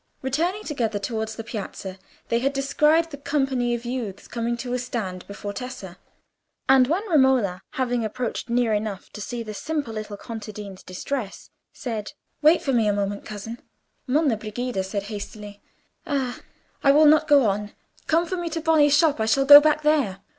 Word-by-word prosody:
Returning 335 Hz, +10 st, -1 dB
together 230 Hz, -8 st, -2 dB
towards 220 Hz, +1 st, -3 dB
the 225 Hz, -, -6 dB
Piazza, 195 Hz, -4 st, -6 dB, 0.3 s
they 230 Hz, -, +2 dB
had 275 Hz, +3 st, 0 dB
descried 300 Hz, +4 st, +2 dB
the 285 Hz, -, -7 dB
company 270 Hz, -4 st, 0 dB
of 235 Hz, 0 st, -7 dB
youths 235 Hz, -6 st, -5 dB
coming 235 Hz, 0 st, -2 dB
to 245 Hz, +1 st, -4 dB
a 250 Hz, -, 0 dB
stand 205 Hz, -7 st, -4 dB
before 200 Hz, 0 st, -6 dB
Tessa, 200 Hz, -6 st, -7 dB, 0.7 s
and 265 Hz, -1 st, +6 dB
when 370 Hz, +9 st, -1 dB
Romola, 265 Hz, -, +3 dB
having 245 Hz, -2 st, 0 dB
approached 240 Hz, +2 st, -4 dB
near 235 Hz, -2 st, +2 dB
enough 210 Hz, -2 st, -3 dB
to 210 Hz, -, -8 dB
see 235 Hz, +2 st, -4 dB
the 215 Hz, -1 st, -7 dB
simple 290 Hz, +1 st, -3 dB
little 215 Hz, -1 st, -6 dB
contadina's 210 Hz, -3 st, -8 dB
distress, 200 Hz, +3 st, -5 dB, 0.2 s
said, 225 Hz, -2 st, -5 dB, 0.3 s
"Wait 310 Hz, +3 st, +5 dB
for 270 Hz, -, 0 dB
me 230 Hz, -3 st, +3 dB
a 205 Hz, -, +3 dB
moment, 200 Hz, 0 st, -2 dB
cousin," 220 Hz, +2 st, -7 dB, 0.5 s
Monna 275 Hz, -3 st, +2 dB
Brigida 215 Hz, 0 st, -3 dB
said 195 Hz, +1 st, -3 dB
hastily, 205 Hz, 0 st, -8 dB, 0.5 s
"Ah, 265 Hz, -4 st, -2 dB, 0.4 s
I 275 Hz, -, +6 dB
will 300 Hz, +2 st, +6 dB
not 305 Hz, +1 st, +5 dB
go 285 Hz, -4 st, +6 dB
on: 205 Hz, 0 st, -1 dB, 0.3 s
come 330 Hz, +2 st, +3 dB
for 370 Hz, +2 st, -3 dB
me 345 Hz, -1 st, -3 dB
to 325 Hz, +1 st, -3 dB
Boni's 305 Hz, -3 st, +4 dB
shop,—I 285 Hz, -10 st, +2 dB
shall 270 Hz, +5 st, +3 dB
go 290 Hz, +1 st, +11 dB
back 305 Hz, 0 st, +2 dB
there." 275 Hz, -11 st, +1 dB
240 Hz, 175 wpm, -24 LUFS, 210-285 Hz, 0.7 s, go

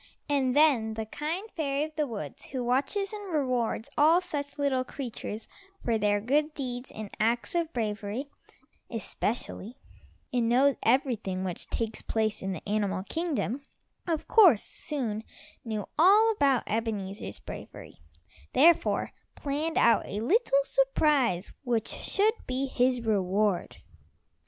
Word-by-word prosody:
And 275 Hz, -3 st, +1 dB
then 260 Hz, -8 st, +4 dB
the 220 Hz, 0 st, -3 dB
kind 315 Hz, -, -4 dB
fairy 280 Hz, -3 st, 0 dB
of 310 Hz, 0 st, -6 dB
the 300 Hz, -1 st, 0 dB
woods, 200 Hz, -, -6 dB
who 260 Hz, -2 st, -4 dB
watches 280 Hz, -, 0 dB
and 410 Hz, -3 st, -6 dB
rewards 255 Hz, -7 st, 0 dB
all 315 Hz, +4 st, +6 dB
such 290 Hz, -6 st, -5 dB
little 275 Hz, -3 st, +1 dB
creatures 235 Hz, -4 st, -6 dB, 0.4 s
for 230 Hz, -2 st, +1 dB
their 205 Hz, 0 st, +2 dB
good 295 Hz, +7 st, +1 dB
deeds 250 Hz, -2 st, -4 dB
and 215 Hz, -2 st, -8 dB
acts 230 Hz, +2 st, +1 dB
of 340 Hz, -2 st, 0 dB
bravery, 215 Hz, +2 st, -3 dB, 0.6 s
especially, 230 Hz, +1 st, -3 dB, 0.6 s
and 235 Hz, -2 st, +2 dB
knows 265 Hz, +3 st, +4 dB
everything 225 Hz, -7 st, +1 dB
which 180 Hz, -2 st, -4 dB
takes 225 Hz, -1 st, -2 dB
place 220 Hz, -1 st, -1 dB
in 195 Hz, -, -2 dB
the 185 Hz, -, -6 dB
animal 200 Hz, -2 st, 0 dB
kingdom, 290 Hz, -, -2 dB, 0.4 s
of 325 Hz, -3 st, -1 dB
course 365 Hz, -, +6 dB
soon 230 Hz, -8 st, -4 dB, 0.4 s
knew 215 Hz, -3 st, -4 dB
all 415 Hz, +7 st, +7 dB
about 280 Hz, -, +2 dB
Ebenezer's 210 Hz, -3 st, -3 dB
bravery, -, -, -10 dB, 0.5 s
therefore 335 Hz, +4 st, +4 dB, 0.2 s
planned 300 Hz, +3 st, -2 dB
out 235 Hz, -, +4 dB
a 205 Hz, -, -4 dB
little 280 Hz, -, +3 dB
surprise 295 Hz, -, +2 dB
which 235 Hz, -4 st, 0 dB
should 425 Hz, +2 st, +1 dB
be 255 Hz, +2 st, -1 dB
his 250 Hz, -1 st, +1 dB
reward. 200 Hz, -3 st, 0 dB
255 Hz, 130 wpm, -28 LUFS, 220-300 Hz, 0.6 s, all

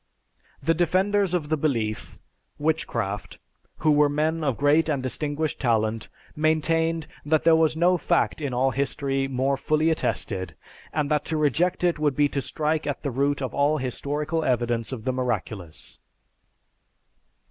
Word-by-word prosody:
"The 165 Hz, -, +3 dB
defenders 185 Hz, +3 st, +1 dB
of 150 Hz, -4 st, -2 dB
the 155 Hz, -, +1 dB
belief 115 Hz, -8 st, -2 dB, 0.4 s
(Witchcraft), 115 Hz, -, -2 dB, 0.4 s
who 155 Hz, -, +2 dB
were 150 Hz, 0 st, +4 dB
men 155 Hz, +2 st, 0 dB
of 135 Hz, -5 st, 0 dB
great 150 Hz, +3 st, +3 dB
and 140 Hz, -4 st, -1 dB
distinguished 145 Hz, +3 st, -2 dB
talent, 110 Hz, -3 st, 0 dB, 0.3 s
maintained 160 Hz, +1 st, +1 dB, 0.2 s
that 155 Hz, +1 st, +1 dB
there 165 Hz, 0 st, +6 dB
was 160 Hz, -1 st, +3 dB
no 175 Hz, +2 st, +3 dB
fact -, -, +1 dB
in 140 Hz, -3 st, -2 dB
all 130 Hz, +2 st, +1 dB
history 135 Hz, 0 st, -1 dB
more 135 Hz, +1 st, 0 dB
fully 155 Hz, +3 st, +1 dB
attested, 95 Hz, -, -2 dB, 0.4 s
and 150 Hz, -1 st, -1 dB
that 150 Hz, -1 st, +2 dB
to 160 Hz, -, -2 dB
reject 155 Hz, +5 st, +1 dB
it 175 Hz, -3 st, +2 dB
would 145 Hz, -3 st, +1 dB
be 145 Hz, 0 st, +4 dB
to 140 Hz, -, -2 dB
strike 155 Hz, +2 st, -1 dB
at 145 Hz, -, -3 dB
the 140 Hz, -, -1 dB
root 140 Hz, +2 st, 0 dB
of 130 Hz, -, -4 dB
all 145 Hz, +2 st, +2 dB
historical 150 Hz, +4 st, -2 dB
evidence 120 Hz, -3 st, 0 dB
of 120 Hz, -5 st, -5 dB
the 130 Hz, -, -1 dB
miraculous." 110 Hz, -9 st, -4 dB
145 Hz, 155 wpm, -25 LUFS, 130-160 Hz, 0.4 s, there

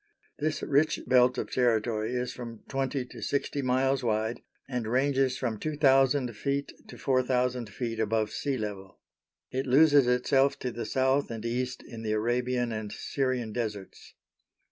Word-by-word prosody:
This 155 Hz, +1 st, -1 dB
rich 145 Hz, +2 st, +2 dB
belt 125 Hz, 0 st, +4 dB
of -, -, -3 dB
territory 115 Hz, -1 st, +1 dB
is 125 Hz, 0 st, -2 dB
from 115 Hz, -3 st, -8 dB
twenty 135 Hz, -1 st, -2 dB
to 120 Hz, -2 st, -11 dB
sixty 140 Hz, +3 st, -1 dB
miles 135 Hz, +1 st, +1 dB
wide 110 Hz, 0 st, -1 dB, 0.3 s
and 125 Hz, -4 st, -3 dB
ranges 130 Hz, +1 st, +2 dB
from 115 Hz, -5 st, -2 dB
2,000 135 Hz, -3 st, +3 dB
ft. 140 Hz, +5 st, -4 dB
to -, -, -11 dB
4,000 125 Hz, -3 st, 0 dB
ft. 115 Hz, +1 st, -4 dB
above 110 Hz, 0 st, 0 dB
sea 140 Hz, -2 st, -2 dB
level. 100 Hz, -4 st, -6 dB, 0.5 s
It 130 Hz, +1 st, -2 dB
loses 145 Hz, 0 st, +6 dB
itself 135 Hz, +3 st, +3 dB
to 125 Hz, -, -3 dB
the 120 Hz, 0 st, -5 dB
South 130 Hz, +1 st, +1 dB
and 115 Hz, -1 st, -6 dB
East 125 Hz, +1 st, -2 dB
in 115 Hz, -2 st, -9 dB
the 110 Hz, -1 st, -1 dB
Arabian 120 Hz, +2 st, 0 dB
and 110 Hz, -2 st, -4 dB
Syrian 130 Hz, -5 st, -2 dB
Deserts. 105 Hz, -5 st, -5 dB
125 Hz, 150 wpm, -28 LUFS, 115-135 Hz, 0.5 s, loses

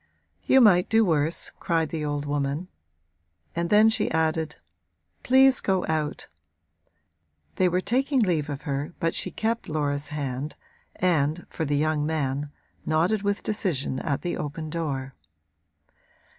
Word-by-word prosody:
'You 265 Hz, -, +6 dB
might 185 Hz, -5 st, +5 dB
do 225 Hz, 0 st, +4 dB
worse,' 160 Hz, -2 st, 0 dB
cried 165 Hz, -2 st, 0 dB
the 160 Hz, -2 st, -3 dB
old 145 Hz, -1 st, -2 dB
woman; 145 Hz, +4 st, -2 dB, 0.9 s
and 170 Hz, 0 st, -1 dB
then 210 Hz, +1 st, +6 dB
she 225 Hz, -1 st, +1 dB
added: 160 Hz, 0 st, 0 dB, 0.7 s
'Please 265 Hz, +1 st, +5 dB
go 190 Hz, -2 st, +1 dB
out!' 155 Hz, -2 st, -2 dB, 1.3 s
They 185 Hz, -, +3 dB
were 180 Hz, +1 st, +1 dB
taking 265 Hz, +5 st, +1 dB
leave 165 Hz, -9 st, +1 dB
of 145 Hz, 0 st, -5 dB
her 145 Hz, +2 st, -3 dB
but 165 Hz, 0 st, 0 dB
she -, -, -1 dB
kept 225 Hz, +4 st, -2 dB
Laura's 145 Hz, -2 st, -1 dB
hand 145 Hz, -1 st, -4 dB, 0.4 s
and, 165 Hz, -2 st, +1 dB
for 160 Hz, -, -3 dB
the 145 Hz, 0 st, 0 dB
young 155 Hz, 0 st, +1 dB
man, 145 Hz, -2 st, -1 dB, 0.3 s
nodded 175 Hz, +7 st, +1 dB
with 205 Hz, 0 st, -1 dB
decision 165 Hz, -11 st, -1 dB
at 140 Hz, 0 st, -2 dB
the 175 Hz, -, -2 dB
open 155 Hz, +1 st, -5 dB
door. 140 Hz, -5 st, -3 dB
160 Hz, 140 wpm, -26 LUFS, 145-185 Hz, 1.3 s, You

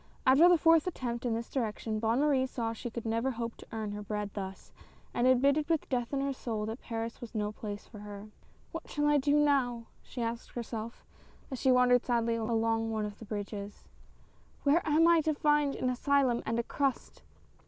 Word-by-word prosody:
After 280 Hz, +7 st, +7 dB
the 355 Hz, -, +6 dB
fourth 330 Hz, +1 st, +4 dB
attempt 245 Hz, -8 st, -3 dB
in 230 Hz, -, 0 dB
this 230 Hz, +1 st, -4 dB
direction, 220 Hz, -3 st, -2 dB
Bonne 230 Hz, +4 st, +1 dB
Marie 275 Hz, -3 st, +2 dB
saw 230 Hz, -3 st, -3 dB
she 240 Hz, +2 st, -6 dB
could 235 Hz, 0 st, -6 dB
never 230 Hz, +3 st, 0 dB
hope 230 Hz, -2 st, -4 dB
to -, -, -13 dB
earn 220 Hz, -2 st, -3 dB
her 205 Hz, 0 st, -5 dB
bread 210 Hz, 0 st, -4 dB
thus, 195 Hz, -1 st, -7 dB, 0.4 s
and 240 Hz, -, +2 dB
admitted 280 Hz, +4 st, +3 dB
with 325 Hz, -2 st, +1 dB
death 245 Hz, -3 st, -1 dB
in 275 Hz, -1 st, 0 dB
her 275 Hz, 0 st, -1 dB
soul, 225 Hz, -5 st, -3 dB
that 220 Hz, +3 st, -5 dB
Paris 230 Hz, +1 st, -5 dB
was 240 Hz, -1 st, -9 dB
no 210 Hz, -1 st, -1 dB
place 205 Hz, -1 st, -7 dB
for 215 Hz, -, -12 dB
her. 205 Hz, 0 st, -8 dB, 0.2 s
" -, -, -32 dB
What -, -, -7 dB
shall 295 Hz, 0 st, -1 dB
I 295 Hz, 0 st, +4 dB
do 285 Hz, +2 st, +2 dB
now? 270 Hz, -6 st, +2 dB
" -, -, -34 dB
she 245 Hz, -, -6 dB
asked 230 Hz, +1 st, -4 dB
herself, 230 Hz, -1 st, -6 dB, 0.5 s
as 260 Hz, -, -4 dB
she 265 Hz, -, +3 dB
wandered 250 Hz, -1 st, +5 dB
sadly 235 Hz, -1 st, +1 dB
along 225 Hz, 0 st, 0 dB
one 220 Hz, -1 st, -1 dB
of 205 Hz, -1 st, -7 dB
the 225 Hz, -, -9 dB
bridges. 205 Hz, -1 st, -6 dB, 0.4 s
" -, -, -32 dB
Where 295 Hz, +4 st, +4 dB
am 320 Hz, +3 st, +5 dB
I 340 Hz, -1 st, +6 dB
to 310 Hz, 0 st, 0 dB
find 295 Hz, -1 st, +2 dB
an 255 Hz, -, 0 dB
asylum 260 Hz, -1 st, +2 dB
and 230 Hz, -, 0 dB
a 235 Hz, -, +1 dB
crust 275 Hz, +2 st, -2 dB
235 Hz, 215 wpm, -31 LUFS, 225-275 Hz, 0.5 s, After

